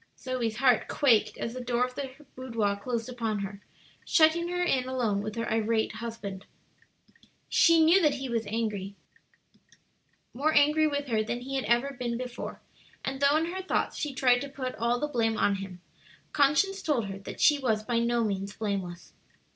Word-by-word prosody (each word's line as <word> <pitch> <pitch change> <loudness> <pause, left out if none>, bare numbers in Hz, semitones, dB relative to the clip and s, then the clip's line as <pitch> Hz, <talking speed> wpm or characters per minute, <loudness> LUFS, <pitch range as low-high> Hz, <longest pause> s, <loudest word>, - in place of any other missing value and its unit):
Zoe's 250 -4 -2
heart 250 -3 +3
quaked 240 -7 +2
as 230 - -4
the 255 - -5
door 245 0 +1
of 250 - -8
her 270 +2 -7
boudoir 230 -6 -1
closed 230 +3 -3
upon 230 -4 -2
her, 200 0 -6 0.4
shutting 330 +1 +4
her 355 0 -1
in 260 -7 +1
alone 230 -6 0
with 215 0 -5
her 230 0 -2
irate 225 0 +1
husband. 215 -3 -7 1.0
She 330 -1 +5
knew 355 +4 +6
that 300 -4 +3
he 270 -1 -5
was 230 -3 -2
angry, 205 -3 -3 1.4
more 300 +5 0
angry 300 +2 +5
with 285 -1 -2
her 220 -2 +2
than 240 +3 -3
he 270 +2 -5
had 265 - -1
ever 240 +4 +2
been 240 -1 -2
before, 250 -1 -6 0.4
and 270 0 -3
though 280 +2 +5
in 330 +2 -1
her 380 - -3
thoughts 375 - -1
she 300 - -3
tried 250 -2 +4
to 280 - -5
put 260 -2 -5
all 235 +1 +1
the 295 - -1
blame 225 -5 0
on 200 -1 +2
him, 190 -2 -8 0.5
conscience 310 +8 +2
told 270 -8 0
her 195 0 -6
that 195 - -9
she 295 -2 +5
was 220 -5 0
by 235 +1 0
no 235 0 +1
means 200 -1 -3
blameless. 190 -6 -4
245 Hz, 185 wpm, -28 LUFS, 220-280 Hz, 1.4 s, knew